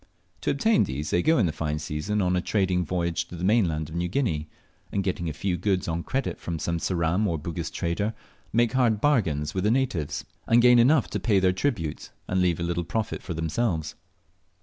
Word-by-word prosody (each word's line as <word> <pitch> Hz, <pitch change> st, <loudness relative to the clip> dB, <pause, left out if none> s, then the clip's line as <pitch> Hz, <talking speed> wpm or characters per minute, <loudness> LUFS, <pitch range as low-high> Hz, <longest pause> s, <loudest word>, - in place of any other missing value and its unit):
To -, -, -1 dB
obtain 225 Hz, -2 st, +3 dB
these, 75 Hz, +3 st, -4 dB
they 85 Hz, -, +3 dB
go 160 Hz, -, +3 dB
in 110 Hz, -, +3 dB
the 85 Hz, -, 0 dB
fine 75 Hz, -1 st, -2 dB
season 75 Hz, +7 st, -2 dB
on 90 Hz, 0 st, +1 dB
a 90 Hz, -, +1 dB
trading 95 Hz, -2 st, +1 dB
voyage 85 Hz, 0 st, -1 dB
to 90 Hz, -, -9 dB
the 85 Hz, -, -6 dB
mainland 90 Hz, -7 st, +2 dB
of 80 Hz, -, -10 dB
New 85 Hz, +1 st, -1 dB
Guinea, 85 Hz, -, -1 dB, 0.4 s
and 100 Hz, -, 0 dB
getting 90 Hz, -3 st, -2 dB
a -, -, -2 dB
few 90 Hz, +4 st, -2 dB
goods 95 Hz, +1 st, 0 dB
on 85 Hz, 0 st, -1 dB
credit 135 Hz, +7 st, -2 dB
from 85 Hz, -1 st, -4 dB
some 85 Hz, +2 st, -2 dB
Ceram 90 Hz, +4 st, +1 dB
or 85 Hz, -, 0 dB
Bugis 80 Hz, +2 st, -4 dB
trader, 100 Hz, +5 st, -2 dB, 0.4 s
make 120 Hz, 0 st, +3 dB
hard 120 Hz, -5 st, +2 dB
bargains 80 Hz, -, +1 dB
with 95 Hz, -, -1 dB
the 105 Hz, -, +3 dB
natives, 115 Hz, -, -1 dB, 0.2 s
and 115 Hz, -, +5 dB
gain 125 Hz, 0 st, +7 dB
enough 130 Hz, +3 st, +4 dB
to -, -, -1 dB
pay 105 Hz, -4 st, +2 dB
their 95 Hz, -1 st, +3 dB
tribute, 95 Hz, -, -2 dB, 0.2 s
and 95 Hz, 0 st, +1 dB
leave 85 Hz, -2 st, +2 dB
a -, -, -2 dB
little 85 Hz, 0 st, -1 dB
profit 110 Hz, +6 st, -3 dB
for 85 Hz, -, -5 dB
themselves. 80 Hz, 0 st, -1 dB
90 Hz, 215 wpm, -26 LUFS, 80-110 Hz, 0.4 s, gain